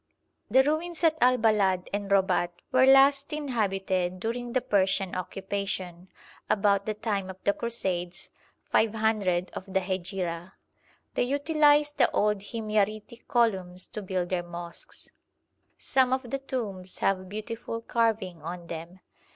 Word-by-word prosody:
The 260 +5 +6
ruins 320 +4 -1
at 320 -1 +5
Al 255 +1 +5
Balad 200 -5 +2
and 205 -1 -2
Robat 190 -3 +3 0.2
were 260 0 +5
last 275 +1 +6
inhabited 195 -10 -1
during 235 +3 -3
the 255 - +3
Persian 195 -4 +1
occupation, 190 -1 -4 0.4
about 200 -1 +2
the 215 - -1
time 205 -3 -2
of 190 - -8
the 200 - +3
Crusades, 185 -7 -3 0.4
500 215 -5 +1
of 190 +1 -8
the 190 - +2
Hejira. 185 -2 -3 0.6
They - - 0
utilised 295 +2 +3
the - - +5
old 210 -1 +2
Himyaritic 215 +1 -2
columns 190 -8 +1
to 215 - -5
build 185 -2 -2
their 180 -2 0
mosques. 175 0 -8 0.7
Some 260 -1 +2
of 260 -2 -2
the 275 - -1
tombs 205 -9 -5
have 185 -1 0
beautiful 230 +2 -5
carving 225 -7 0
on 170 +2 -6
them. 170 +3 -8
205 Hz, 135 wpm, -28 LUFS, 185-240 Hz, 0.7 s, The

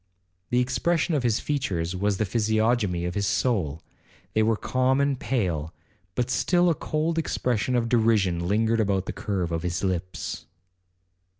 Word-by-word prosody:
The 125 - +2
expression 165 +7 +1
of 145 - +2
his 115 -3 +1
features 95 - -2
was 100 +1 0
the 110 - +1
physiognomy 110 -3 +1
of 90 - -2
his 100 -1 0
soul,—they 100 - -2
were 110 0 +2
calm 130 +3 +1
and 140 -2 +1
pale, 85 - -1 0.4
but 125 0 -1
still 175 +6 +3
a - - +3
cold 160 +2 -1
expression 125 -6 0
of 120 -1 +1
derision 105 -7 +2
lingered 110 +3 +2
about 100 -3 +1
the - - -4
curve 95 -4 -2
of 85 0 -1
his 90 +2 -2
lips. 90 -1 -3
110 Hz, 155 wpm, -26 LUFS, 95-125 Hz, 0.4 s, still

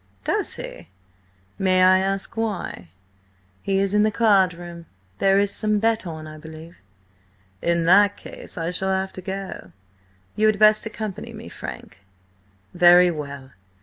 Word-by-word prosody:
"Does - - 0
he? - - -9 0.7
May 185 -1 +3
I 185 0 +6
ask 195 +2 -1
why?" 205 - -4 0.7
"He 195 -1 -1
is 195 0 +1
in 210 - +3
the 215 - +3
card 200 -4 +3
room. 170 -1 -10 0.3
There 195 0 +3
is 200 0 +1
some 215 -1 +1
bet 225 -1 0
on, 160 -2 -7
I 155 0 -10
believe." 160 +2 -12 0.8
"In 170 0 +1
that 200 +4 +4
case - - -10
I 165 +1 -2
shall 190 +1 -1
have 190 0 -1
to 185 - -8
go. 190 - -7 0.6
You 215 +1 +2
had 215 -1 +2
best 215 +1 +4
accompany 215 -3 -6
me, - - -10
Frank." - - -9 0.7
"Very 175 0 +6
well. 140 -4 -8
190 Hz, 150 wpm, -22 LUFS, 170-205 Hz, 0.8 s, I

